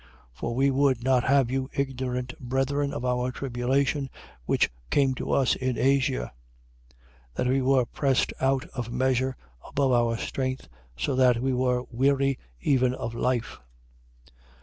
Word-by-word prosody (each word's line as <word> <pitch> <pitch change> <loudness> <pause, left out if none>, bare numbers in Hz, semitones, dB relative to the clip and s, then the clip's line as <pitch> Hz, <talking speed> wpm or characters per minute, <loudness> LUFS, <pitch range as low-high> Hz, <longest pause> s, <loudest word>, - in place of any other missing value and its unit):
1:8. - - -24 0.3
For 65 - -4
we 135 +2 +3
would 135 -3 +2
not 130 -1 +3
have 135 -2 +3
you 130 0 -1
ignorant, 125 -2 -2
brethren, 135 +3 -1
of 125 - -4
our 125 0 0
tribulation 135 +2 -1 0.4
which - - +2 0.2
came 135 -2 +3
to - - -4
us 135 -3 +3
in 130 -1 -2
Asia: 130 - +1 1.0
that - - -1
we 130 +2 +2
were 130 -1 +3
pressed 135 +2 0
out 135 +1 +2
of 120 -3 -4
measure 130 0 0 0.3
above 135 -2 0
our 120 -1 +2
strength, 130 +2 -3 0.3
so 60 - -1
that 125 -2 +4
we 130 +1 0
were 125 -1 +1
weary 135 +2 +2 0.2
even 130 -2 +2
of 115 - -5
life. 120 0 -1
130 Hz, 150 wpm, -26 LUFS, 125-135 Hz, 1.0 s, that